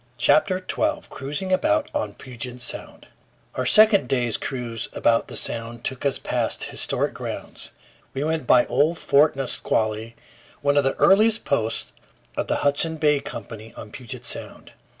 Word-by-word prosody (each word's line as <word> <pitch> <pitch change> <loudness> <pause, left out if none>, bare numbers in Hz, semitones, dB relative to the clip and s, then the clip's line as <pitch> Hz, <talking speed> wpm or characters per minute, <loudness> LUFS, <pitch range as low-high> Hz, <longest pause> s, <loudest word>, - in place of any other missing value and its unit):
] 120 - -36
CHAPTER 185 +6 +3
TWELVE 300 +11 -2
CRUISING 145 +8 -4
ABOUT 310 +9 +1
ON 295 0 -3
PUGET 125 -1 -8
SOUND 120 - -5 0.5
OUR 130 - -2
second 210 - +6
day's 120 -4 +1
cruise 120 -4 -4
about 115 -1 +2
the - - -7
Sound 115 0 -3
took 130 +1 0
us 140 - 0
past - - -2
historic - - -1
grounds. - - -7 0.5
We 135 - -1
went 155 -3 -1
by 125 - +6
old 155 +6 +1
Fort 150 0 +3
Nisqually, 115 -4 -1 0.5
one 145 0 +2
of 145 - +4
the 135 - +1
earliest 220 +3 +4
posts 110 - 0 0.4
of - - -2
the - - 0
Hudson's 160 +3 +1
Bay 150 -2 +3
Company 110 -4 -9
on 105 - -9
Puget 125 -3 -9
Sound. - - -6
135 Hz, 155 wpm, -23 LUFS, 120-160 Hz, 0.5 s, second